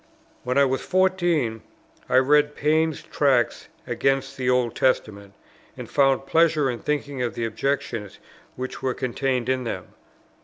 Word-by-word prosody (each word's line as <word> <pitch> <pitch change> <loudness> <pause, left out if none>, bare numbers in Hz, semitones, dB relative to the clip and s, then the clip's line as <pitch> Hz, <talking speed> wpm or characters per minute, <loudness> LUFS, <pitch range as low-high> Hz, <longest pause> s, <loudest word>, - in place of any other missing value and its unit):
When 125 +2 -1
I 140 - +6
was 130 0 -1
fourteen, 175 -11 +1 0.5
I 125 - +4
read 145 +2 +4
Paine's 155 +1 +1
Tracts 130 -5 +1 0.2
against 135 0 0
the 130 -2 -1
Old 125 -2 +1
Testament, 100 -6 -1 0.4
and - - -7
found 135 -1 +2
pleasure 155 -3 +3
in 120 - -6
thinking 145 -3 -3
of 120 -2 -2
the 115 - -2
objections 115 -2 -3 0.4
which 130 +1 -6
were 130 -1 -1
contained 130 -1 -1
in 130 0 0
them. 115 - -5
130 Hz, 145 wpm, -24 LUFS, 125-145 Hz, 0.5 s, I